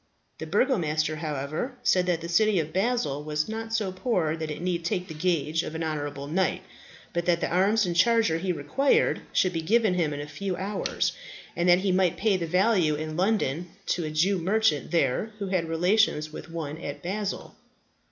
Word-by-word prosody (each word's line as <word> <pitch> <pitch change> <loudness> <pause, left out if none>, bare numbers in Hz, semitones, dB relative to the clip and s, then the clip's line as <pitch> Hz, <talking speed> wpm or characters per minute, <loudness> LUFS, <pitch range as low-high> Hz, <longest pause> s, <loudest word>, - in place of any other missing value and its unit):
The - - -5
Burgomaster, 155 - +1
however, 155 - -3
said 180 -6 +3
that 170 -2 +1
the 170 - -5
city 205 +3 +3
of 155 -1 -3
Basle 190 - 0
was 150 0 -1
not 225 +1 -5
so 215 -4 0
poor 185 -6 0
that 160 -1 -5
it 150 - -5
need 175 -1 -2
take 180 0 -2
the 160 - -7
gage 160 -1 0
of 160 - -6
an 165 - -2
honourable 145 -3 -3
knight, 185 +4 0 0.5
but 170 0 -2
that 170 -1 +3
the - - -1
arms 200 +4 +3
and 175 -1 -2
charger 200 -3 +3
he 185 +1 -1
required 180 - +1
should 185 -1 +2
be 165 - -1
given 215 +3 +3
him 170 -4 0
in 145 - -4
a 145 - -4
few 180 +6 -4
hours, 195 +3 -1 0.4
and 175 +1 +1
that 175 +1 +6
he 195 -1 +1
might 185 -2 +2
pay 210 -1 +2
the 170 -3 -2
value 180 -3 +3
in 155 +1 -5
London 180 -4 0 0.2
to 175 - -1
a 155 - -3
Jew 180 +6 +1
merchant 195 -3 +1
there 170 - 0
who 200 -2 -4
had 175 -4 0
relations 165 -2 +2
with - - -8
one 160 -2 -5
at 145 - -6
Basle. 200 +3 -4
175 Hz, 200 wpm, -27 LUFS, 155-195 Hz, 0.5 s, that